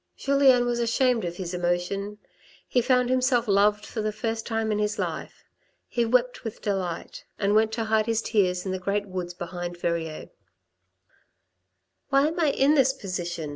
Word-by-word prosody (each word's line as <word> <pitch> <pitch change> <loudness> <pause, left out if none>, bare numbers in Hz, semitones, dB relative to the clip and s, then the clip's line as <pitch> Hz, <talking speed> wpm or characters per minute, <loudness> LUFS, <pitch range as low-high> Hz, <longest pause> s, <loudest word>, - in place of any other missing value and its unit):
Julien 275 -3 +4
was 240 0 -1
ashamed 235 0 +2
of 170 0 -4
his 185 -2 -5
emotion; 180 +4 -2 0.5
he 245 - +2
found 250 0 +2
himself 255 -2 +2
loved 205 +1 +3
for 220 - -4
the 215 0 -1
first 225 +1 -3
time 225 -1 -1
in 210 - 0
his 210 +1 -1
life; - - -5 0.4
he 240 -1 0
wept 245 +1 +1
with 225 -2 -6
delight; 185 -5 -3
and 200 0 +1
went 220 +1 +3
to 225 0 -1
hide 220 0 +1
his 225 0 0
tears 180 -4 +1
in 190 - -2
the 185 - -2
great 200 +2 -1
woods 180 -2 -5
behind 175 0 -6
Verrieres. 165 -2 -3 0.9
" 90 0 -51
Why 275 +1 +4
am 330 +2 -5
I 325 - +3
in 275 +1 +3
this 270 -3 +4
position 175 - -4
210 Hz, 175 wpm, -26 LUFS, 180-245 Hz, 0.9 s, Julien